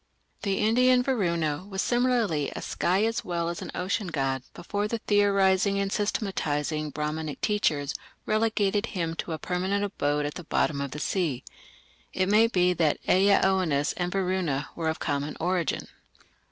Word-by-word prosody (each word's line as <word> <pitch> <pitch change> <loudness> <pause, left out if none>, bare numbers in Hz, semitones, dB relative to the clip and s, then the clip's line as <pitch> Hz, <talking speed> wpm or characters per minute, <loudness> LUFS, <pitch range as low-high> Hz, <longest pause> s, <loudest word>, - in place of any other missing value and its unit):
The 195 -2 0
Indian 250 +3 +4
Varuna 170 - 0
was 190 -1 -5
similarly 240 - +1
a - - -4
sky 190 +4 +1
as 225 0 -1
well 170 -1 -2
as 170 - -5
an - - -6
ocean 190 +2 -1
god 135 -5 -1
before 205 +4 -2
the 230 - -2
theorizing 200 -2 +3
and 200 0 -1
systematizing 155 -8 -1
Brahmanic 150 0 -3
teachers 150 -9 0 0.3
relegated 215 -1 +1
him 165 -2 -1
to - - -4
a 160 - -2
permanent 185 +4 -1
abode 145 -7 -1
at 145 - -3
the 180 - -7
bottom 145 -2 0
of 140 - -3
the 150 - -6
sea. 150 -6 -1 0.7
It 185 0 +1
may 215 +2 +5
be 180 -5 +2
that 160 -4 +2
Ea 195 +2 +5
Oannes 175 -7 +2
and 180 0 -2
Varuna 185 -7 -1
were 165 -1 -1
of 160 - -2
common 145 +1 -2
origin. 175 0 -1
180 Hz, 160 wpm, -27 LUFS, 155-205 Hz, 0.7 s, may